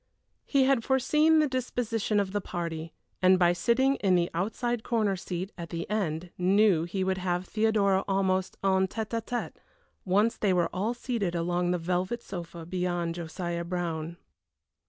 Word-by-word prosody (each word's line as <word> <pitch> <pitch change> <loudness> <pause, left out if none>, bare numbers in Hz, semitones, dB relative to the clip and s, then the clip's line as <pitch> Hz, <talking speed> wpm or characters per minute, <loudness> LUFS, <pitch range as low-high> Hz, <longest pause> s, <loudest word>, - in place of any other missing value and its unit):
He 275 -2 +3
had 260 -3 +3
foreseen 300 +5 +3
the 305 -1 +4
disposition 235 -5 -1
of 195 -2 -1
the 205 0 -1
party, 165 -3 -4 0.3
and 185 0 +6
by 175 -1 +4
sitting 260 +9 +2
in 190 -3 +2
the 175 -1 +1
outside 225 +7 -1
corner 220 -4 +1
seat 185 +1 -5
at 170 -1 -6
the 170 -1 -4
end 175 -5 -2
knew 185 -2 +4
he 190 +2 -2
would 190 0 0
have 180 0 -1
Theodora 205 -2 +2
almost 190 -1 0
en 190 -1 +3
tête 220 +2 -4
à 230 - 0
tête, 245 +1 -4 0.5
once 205 +5 +2
they 200 -3 +2
were 175 -2 +1
all 215 +6 -1
seated 230 -8 -2
along 175 +1 0
the 180 - +1
velvet 180 +7 -2
sofa 170 -2 -7
beyond 175 -1 -1
Josiah 170 0 -4
Brown. 170 -2 -3
190 Hz, 165 wpm, -28 LUFS, 175-220 Hz, 0.5 s, and